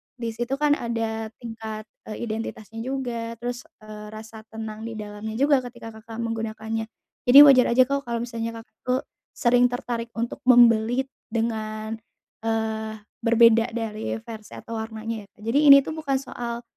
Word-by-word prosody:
Di 235 -2 -4
situ 240 +4 -2
kan 295 +1 +2
ada 225 -1 -2 0.2
tingkat, 220 -1 -6 0.2
eee, 215 +2 -5
identitasnya 220 -1 -5
juga. 235 -2 -3
Terus, 245 +2 -5 0.2
eee, 210 0 -9
rasa 220 0 -11
tenang 220 0 -7
di 225 - -6
dalamnya 210 +1 -6
juga 280 +2 +4
ketika 240 -2 -9
Kakak 225 0 -10
menggunakannya. 225 0 -3 0.4
Jadi 255 +3 +8
wajar 270 -3 +7
aja 255 - +8
kok, 275 0 -2
kalau 235 0 -2
misalnya 230 -1 -4
Kakak 220 - -46
tu 250 - +3 0.4
sering 245 0 +4
tertarik 240 -1 -4
untuk 235 +1 -3
membeli 240 0 +6 0.2
dengan, 220 -1 -3 0.5
eee, 220 -1 -1 0.2
berbeda 230 0 +4
dari 220 -2 -3
versi 220 -2 -9
atau 230 -1 -6
warnanya 220 -1 -5
ya. 210 +1 -20
Jadi 290 +2 +4
ini 275 -1 +10
tuh - - -5
bukan 305 -4 -2
soal 240 -3 -4
230 Hz, 155 wpm, -25 LUFS, 220-245 Hz, 0.5 s, ini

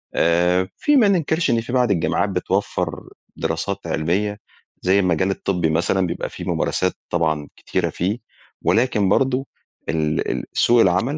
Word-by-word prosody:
آآ، 90 +2 +3
في 295 - +2
ما 235 -7 +6
ننكرش 170 -3 +1
إن 115 -1 +2
في 120 +2 -7
بعض 125 -4 +3
الجامعات 95 +2 +1
بتوفر 95 +1 -2 0.3
دراسات - - -2
علمية؛ 100 +6 -1 0.4
زي 95 +2 +3
المجال 90 0 +1
الطبي 90 -4 -1
مثلًا 90 +3 +1
بيبقى 85 +1 -4
فيه - - -8
ممارسات - - 0 0.2
طبعًا 80 -4 0
كتيرة - - -2
فيه، 100 +7 -2 0.4
ولكن 110 -5 +2
برضه 130 +4 +1 0.4
ال 75 -1 0
ال - - -3
سوق 120 0 +4
العمل 100 +10 +2
95 Hz, 145 wpm, -21 LUFS, 85-120 Hz, 0.4 s, ما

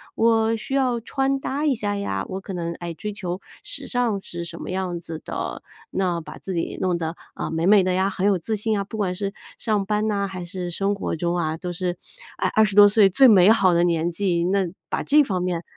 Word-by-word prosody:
我 225 0 +3
需 225 +5 -6
要 250 -4 +1
穿 270 +3 0
搭 285 +3 -2
一 280 - +3
下 205 -2 -2
呀， 95 - -2
我 190 - -4
可 195 0 -8
能 170 -1 -3
爱 170 -1 -6
追 210 +6 -5
求 185 -2 -5 0.2
时 - - -5
尚 235 -6 0
是 170 -2 -6
什 170 0 -8
么 - - -6
样 185 -2 -2
子 160 -2 -7
的， - - -4 0.3
那 180 -3 0
把 - - -10
自 190 - -6
己 165 - -2
弄 180 -2 +1
得， 165 0 -4 0.2
呃， - - -4
美 165 +1 -1
美 200 -1 +6
的 185 - +1
呀， 190 +2 +2
很 190 0 -2
有 200 -3 +3
自 215 +6 -2
信 215 0 -1
啊， 200 - -2
不 220 - -9
管 190 -3 0
是 200 +2 -3 0.3
上 210 -4 0
班 210 +2 0
呐 200 -2 0
还 185 -2 -6
是 180 -1 -5
生 200 +3 0
活 180 - -3
中 175 +1 -1
啊， 160 -2 -1
都 175 0 -5
是， 175 0 -2 0.4
诶， - - +3
20 210 -2 +3
多 205 0 +10
岁 205 -1 +5
最 265 +7 +6
美 200 -2 +7
好 190 -5 +4
的 170 +1 +3
年 170 -1 +1
纪， 175 -1 0
那 190 0 +1 0.2
把 - - -1
这 300 +2 +5
方 185 -8 -2
面， 175 -2 -2
190 Hz, 250 characters per minute, -23 LUFS, 175-215 Hz, 0.4 s, 多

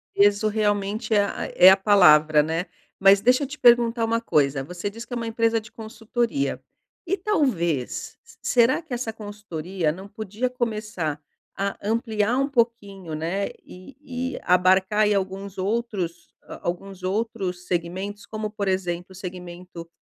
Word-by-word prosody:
"Peso" 205 +1 +4
realmente 210 +1 0
é 205 -1 +4
a - - -4
é 185 - +9
a 190 - +6
palavra, 155 -7 +5
né? 165 +4 -2 0.3
Mas 195 0 +6
deixa 250 +6 +3
eu - - -4
te 290 +3 -9
perguntar 235 -1 +4
uma 230 0 0
coisa 140 -10 +1
você 180 +6 -5
diz 230 +3 -9
que - - -16
é - - -4
uma 230 - -3
empresa 225 0 +1
de 215 - -15
consultoria. 230 +4 -2 0.5
E 390 +3 0
talvez, 235 - -1 0.2
será 245 +5 +3
que 310 -5 -12
essa 235 -2 -3
consultoria 195 -6 -4
não 190 +5 -7
podia 215 +3 -3
começar 215 -11 -3 0.4
a 200 0 -2
ampliar 230 +4 0
pouquinho, 205 - -1
né, 170 +6 -2 0.2
e 255 +5 -7
e - - -6
abarcar 190 +3 +3
aí 210 -1 +4
alguns 195 0 -3
outros, 190 -5 -3
hã, - - -10
alguns 185 +2 -5
outros 190 -2 -3
segmentos, 185 +4 -3
como, 215 -1 -4
por 205 -2 -3
exemplo, 180 -2 -1
o - - -13
segmento 180 -2 -9
205 Hz, 155 wpm, -24 LUFS, 180-230 Hz, 0.5 s, é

